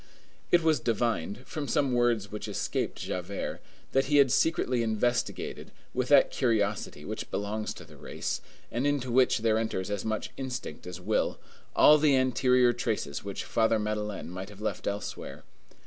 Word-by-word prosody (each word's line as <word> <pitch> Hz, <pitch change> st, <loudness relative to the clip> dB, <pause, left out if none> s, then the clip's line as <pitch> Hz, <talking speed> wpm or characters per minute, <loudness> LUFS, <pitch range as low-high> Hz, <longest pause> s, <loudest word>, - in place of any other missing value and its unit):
It 175 Hz, -1 st, +4 dB
was 160 Hz, -2 st, +3 dB
divined, 115 Hz, -1 st, -1 dB
from 150 Hz, -2 st, -4 dB
some 140 Hz, -1 st, +1 dB
words 120 Hz, -4 st, +2 dB
which 105 Hz, +1 st, -5 dB
escaped 105 Hz, -, -2 dB
Javert, -, -, -4 dB, 0.3 s
that 135 Hz, 0 st, +3 dB
he 145 Hz, +1 st, +3 dB
had 135 Hz, -3 st, +6 dB
secretly 130 Hz, -6 st, +2 dB
investigated, 115 Hz, +2 st, -1 dB, 0.2 s
with -, -, 0 dB
that -, -, +6 dB
curiosity 110 Hz, -4 st, 0 dB
which -, -, -5 dB
belongs 105 Hz, +2 st, -2 dB
to -, -, -11 dB
the -, -, -15 dB
race, -, -, -4 dB, 0.3 s
and 125 Hz, +5 st, 0 dB
into 140 Hz, -4 st, 0 dB
which 125 Hz, -2 st, +4 dB
there 110 Hz, -1 st, +3 dB
enters 105 Hz, -3 st, -2 dB
as 100 Hz, -2 st, -2 dB
much 110 Hz, -1 st, -2 dB
instinct 130 Hz, -, -5 dB
as 90 Hz, -, -6 dB
will, -, -, 0 dB, 0.4 s
all 150 Hz, 0 st, +7 dB
the 145 Hz, -2 st, +4 dB
anterior 125 Hz, -1 st, +4 dB
traces 110 Hz, -11 st, -2 dB
which 100 Hz, -1 st, -4 dB
Father 115 Hz, 0 st, +2 dB
Madeleine 105 Hz, -3 st, -3 dB
might 95 Hz, +2 st, -6 dB
have 105 Hz, -1 st, -13 dB
left 110 Hz, -, -3 dB
elsewhere. 100 Hz, 0 st, -5 dB
115 Hz, 165 wpm, -29 LUFS, 105-130 Hz, 0.4 s, all